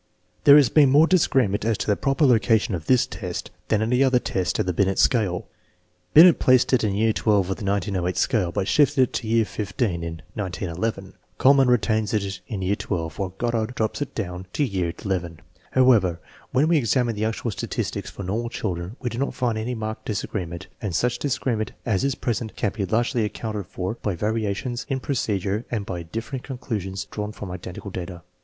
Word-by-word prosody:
There 140 - +10
has 140 -5 +5
been 145 0 +5
more 145 +4 +6
disagreement 135 - +2
as 110 -1 +1
to - - -3
the 105 - +2
proper 135 +6 +1
loca 115 -3 +4
tion 105 - -3
of 85 -3 -4
this 130 -2 +4
test 90 -5 -6 0.2
than 110 0 +2
of 110 - -1
any 125 +2 +4
other 130 -2 +4
test 95 -6 -1
of - - 0
the 90 - -1
Binet 95 +2 +1
scale. 105 -9 +2 0.7
Binet 170 +2 +9
placed 130 0 +4
it 130 - +4
in 100 -2 0
year 110 +2 +3
XII - - -3
of 95 -2 +1
the 110 - -9
1908 95 -2 -1
scale, 95 -7 +1
but 100 +1 -2
shifted 145 -2 +3
it 125 - -2
to 115 - -3
year 115 0 +3
XV 105 +1 -6
in 85 -8 -1
1911. 95 +1 -3 0.3
Kuhlmann 135 0 +5
retains 110 -3 +2
it 100 -2 -2
in 100 -4 -4
year 95 +2 +1
XII, - - -8 0.3
while 95 -2 -4
Goddard 120 0 -1
drops 110 +5 -1
it 145 - -4
down 90 -3 -4
to 150 - +1
year 95 -7 -1
XI. 95 -2 0 0.5
However, 110 -10 +4 0.3
when 135 +4 +3
we 165 -1 +4
examine 120 -2 +1
the 105 0 -2
actual 115 +1 -2
statistics 95 - -4
for 100 - -8
normal 110 +6 -2
children 90 -3 -4
we 125 - -1
do 115 - -4
not 140 - -1
find 120 -4 0
very 120 +3 -3
marked 110 -1 -5
disagreement, 90 -5 -4 0.2
and 100 -6 -3
such 125 +5 +1
disagreement 120 -6 -1
as 100 -6 +1
is 135 -2 +1
present 115 -2 -3
can 105 - 0
be 100 -3 -3
largely 120 +1 +1
accounted 105 -2 -4
for 95 +3 -3
by 100 -4 -1
variations 110 +4 -2
in 135 - 0
procedure 105 -6 -1
and 105 -4 -2
by 90 -3 -4
differing 115 - -5
conclusions 105 -8 -4
drawn 105 0 -5
from 100 -3 -8
identical 90 +2 -7
data. 90 -1 -6
110 Hz, 200 wpm, -24 LUFS, 95-125 Hz, 0.7 s, There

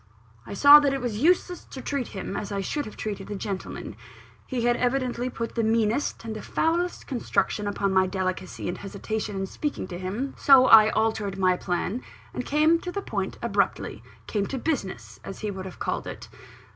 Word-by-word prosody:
I - - -6
saw 285 +6 +10
that 280 -2 +1
it - - -2
was 235 -4 -3
useless 355 +2 +2
to 265 - -9
treat 275 -1 -2
him 190 -2 -6
as 205 - -4
I 200 - -2
should 290 +9 -2
have 215 - -10
treated 205 -3 -5
a 205 - -3
gentleman. 195 -1 -5 0.5
He 250 -3 -2
had 240 0 +3
evidently 250 0 0
put 230 -2 -5
the 230 - 0
meanest 225 +3 0
and 220 -1 -4
the 215 - -6
foulest 345 +2 -1
construction 230 -5 -1
upon 200 -1 0
my 190 0 +4
delicacy 185 -1 -3
and 175 - -3
hesitation 205 +1 -4
in 195 0 -2
speaking 285 +1 -4
to 175 -1 -6
him: 210 +9 -3
so 270 -2 +7
I 220 -3 +8
altered 220 -3 0
my 185 -1 +3
plan, 180 +6 -2 0.3
and 250 - -3
came 310 +4 +3
to 355 - -5
the 400 +2 -4
point - - -3
abruptly - - 0 0.2
"came 205 -2 -1
to 270 - -4
business," 190 - -3
as 195 - -8
he 210 - -2
would 190 -1 -6
have 185 - -8
called - - -3
it. - - -8
220 Hz, 195 wpm, -26 LUFS, 195-270 Hz, 0.5 s, saw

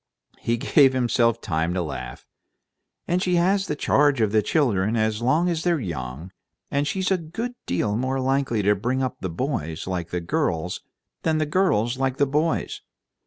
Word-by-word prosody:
He 115 0 0
gave 135 +3 +4
himself 120 -2 +2
time 80 +3 -1
to 90 - 0
laugh. 65 -6 -7 0.8
"And 175 +1 +1
she 180 -1 +1
has 190 +3 +2
the 150 - -1
charge 145 -2 +3
of 110 -2 +2
the 110 0 +4
children 110 - +1
as 110 0 0
long 150 +9 +2
as 170 -2 0
they're 175 -3 +2
young, 75 - -5 0.4
and 140 +1 0
she's 190 +2 -1
a 190 - +4
good 220 +10 -5
deal 105 +4 0
more 130 +3 -1
likely 130 -4 0
to 105 +1 +4
bring 125 +6 -1
up 130 - -3
the 95 - -2
boys 85 - -3
like 90 -2 -3 0.2
girls 85 +1 -1 0.4
than 160 -1 +1
the 155 - +1
girls 130 - +1
like 135 -1 0
boys. 150 +4 0
130 Hz, 170 wpm, -24 LUFS, 100-150 Hz, 0.8 s, gave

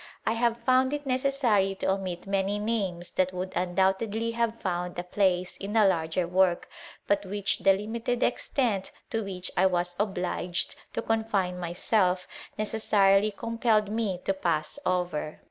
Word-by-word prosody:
I - - +2
have 235 0 +1
found 260 +1 +3
it 290 0 -6
necessary 255 -7 +2
to 190 - 0
omit 185 -2 -3
man 195 -1 0 0.2
names 190 -6 -2
that 185 0 +1
would 185 +1 -4
undoubtedly 190 +5 +1
have 230 0 -1
found 180 -1 -3
a 175 - -2
place 180 -1 0
in 200 +1 -5
larger 180 -5 +2
work, 180 0 +2 0.4
but 205 0 +1
which 200 +1 -1
the 195 - +5
limited 230 +5 -2
extent 235 -6 0 0.2
to 225 -2 -1
which 185 -2 -6
was 180 -1 +2
obliged 180 -3 -1 0.2
to - - -2
confine 210 -5 0
myself, 180 +1 +1 0.3
necessarily 210 -1 +3
compelh 225 -1 +1
me 210 -4 -1
to 195 - +2
pass 165 - -1
over. 175 -4 -1
195 Hz, 145 wpm, -28 LUFS, 180-225 Hz, 0.4 s, the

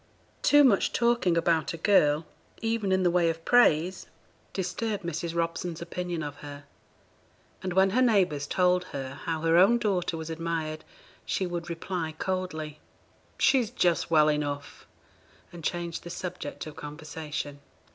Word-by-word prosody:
Too 290 0 +6
much 225 -8 +3
talking 235 -7 +2
about 165 -2 +1
a - - -8
girl, 155 -4 +3 0.3
even 225 -3 -1
in 190 0 +2
the 175 - +3
way 175 -1 +3
of 165 0 -4
praise, 185 -7 +3 0.4
disturbed 205 +2 -3
Mrs. 170 0 -3
Robson's 170 0 -2
opinion 170 -1 -4
of 145 -1 -6
her; 145 -1 -9 1.0
and 185 -1 -3
when 190 +1 +4
her 250 +6 +2
neighbours 185 - +2
told 180 +1 +2
her 135 -1 -6
how 160 -1 -2
her 165 +1 +3
own 200 +7 +6
daughter 190 -7 -1
was 160 0 -6
admired, 160 -1 -3 0.4
she 190 - -1
would 175 -1 -4
reply 165 -1 -4
coldly, 160 -5 -3 0.6
'She's 250 -5 +3
just 175 -9 +1
well 155 -2 +5
enough,' 145 -1 -3 0.7
and 170 -2 -10
change 170 0 -3
the 175 - -9
subject 175 -4 -6
of 155 -1 -9
conversation. 150 -1 -6
170 Hz, 145 wpm, -28 LUFS, 155-185 Hz, 1.0 s, Too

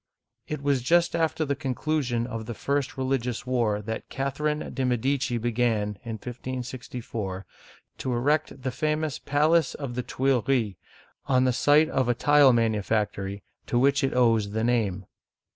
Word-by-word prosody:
It 150 -2 -4
was 140 -2 +2
just 170 +6 +3
after 160 -1 0
the 140 -1 -1
conclusion 130 -3 -1
of 115 -3 -6
the 120 - -5
first 140 +4 -2
religious 130 -2 -1
war 115 -5 0
that 110 +2 -5
Catherine 145 +3 -2
de* 135 - -2
Medici 125 +1 0
began 115 -2 0
(1564) 120 -3 -6 0.5
to 130 - -2
erect 140 +2 0
the 130 - -1
famous 155 +1 -1
palace 155 +1 +2
of 140 -4 -5
the 125 - -2
Tuileries 130 -1 0
(tweel - - -21
ree') 115 -9 +1 0.5
on 130 -1 +3
the 130 -1 +2
site 150 +5 +4
of 130 -2 0
a 120 - +2
tile 145 +1 +6
manu 115 -3 +2
factory 100 -2 -2 0.2
to 120 - 0
which 140 +3 +3
it 135 - 0
owes 115 -4 +3
the 110 +1 0
name. 105 -6 0
125 Hz, 160 wpm, -26 LUFS, 115-140 Hz, 0.5 s, tile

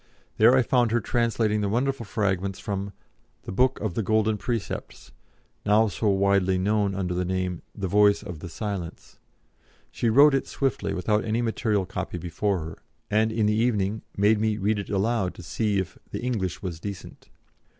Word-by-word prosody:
There 120 +4 +6
I 130 - +4
found 120 -1 +2
her 120 +2 +2
translating 115 -2 0
the 100 - 0
wonderful 125 +1 -1
fragments 100 -3 -1
from 100 -1 -4 0.5
"The - - -6
Book 125 +7 +2
of 105 -4 -2
the 115 - -1
Golden 110 +1 +2
Precepts," 115 -1 -5 0.5
now 105 +1 +4
so 105 +3 -2
widely 100 -1 +3
known 100 +1 +1
under 90 -2 -2
the 90 +1 0
name 90 -1 -2
of - - -10
"The 95 - 0
Voice 105 +2 +4
of 90 -6 -7
the 85 - -7
Silence." 95 -2 -6 0.7
She 115 - 0
wrote 140 +5 +7
it 135 - 0
swiftly, 135 -2 -1
without 105 +3 +1
any 115 +2 0
material 110 -3 0
copy 95 -1 -5
before 90 +2 -1
her, 80 +1 -7 0.3
and 110 +1 +3
in 110 -1 +1
the 105 - +3
evening 110 -2 0 0.2
made 105 +2 +4
me 110 -1 +1
read 105 +1 0
it 100 - -6
aloud 100 -1 0
to - - -10
see 105 +5 -1
if 95 -1 -3
the - - -5
"English 105 -9 -2
was 85 -4 -4
decent." 100 -1 -8
105 Hz, 180 wpm, -26 LUFS, 95-110 Hz, 0.7 s, wrote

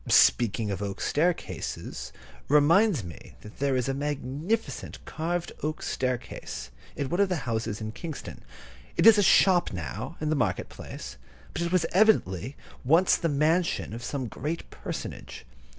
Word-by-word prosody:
Speaking 110 -2 +4
of 100 0 -3
oak 100 -1 -4
staircases 170 +3 -2 0.4
reminds 155 - +4
me 85 -7 -11
that 105 - -13
there 140 -1 +1
is 125 -1 0
a 135 - 0
magnificent 145 - -2
carved 170 +2 -2
oak 155 +1 -3
staircase 120 - -3 0.2
in 140 - -2
one 175 - -1
of 200 -1 +4
the 180 - +1
houses 110 -2 -2
in 110 0 -4
Kingston. 155 +5 -7 0.5
It - - +3
is 225 -2 +9
a - - +6
shop 185 -2 +5
now, 90 - -5
in 155 0 -1
the - - +2
market - - 0
place, 60 +1 -8 0.4
but 170 - -3
it 170 0 -1
was 180 -3 +3
evidently 145 - +3 0.3
once 165 +8 +5
the 165 - 0
mansion 155 -2 +1
of 115 +1 -6
some 135 0 -3
great 150 +8 -4
personage. - - -7
145 Hz, 155 wpm, -27 LUFS, 115-170 Hz, 0.5 s, is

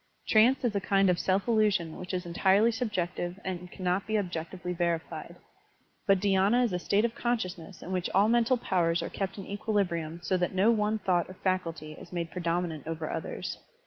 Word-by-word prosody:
Trance 235 +5 +5
is 220 -4 0
a 200 - +1
kind 195 -1 +3
of 175 - -1
self 190 +3 +1
illusion 210 -8 +2
which 180 - -7
is 180 -1 -2
entirely 190 +6 +3
subjective 180 -5 -2
and 180 -1 -4
cannot 185 +1 -1
be 215 0 +1
objectively 180 -1 -4
verified, 170 -1 -2 0.7
but 195 -1 +5
dhySna 200 +5 +3
is 235 - 0
a 180 - 0
state 200 +5 +2
of 235 - -1
consciousness 195 -8 -3
in 180 - -7
which 185 -1 -1
all 200 +3 +4
mental 235 +2 +3
powers 170 -6 +1
are - - -4
kept 195 0 -3
in 195 - -6
equilibritim 185 -6 -1
so 185 - +1
that 180 +1 -1
no 200 +5 +5
one 215 -1 +1
thought 185 -4 0
or 185 - -9
faculty 170 -5 -2
is 155 - -12
made 170 -2 -3
predominant 170 -3 -2
over 160 -1 -3
others. - - -4
185 Hz, 190 wpm, -29 LUFS, 175-210 Hz, 0.7 s, Trance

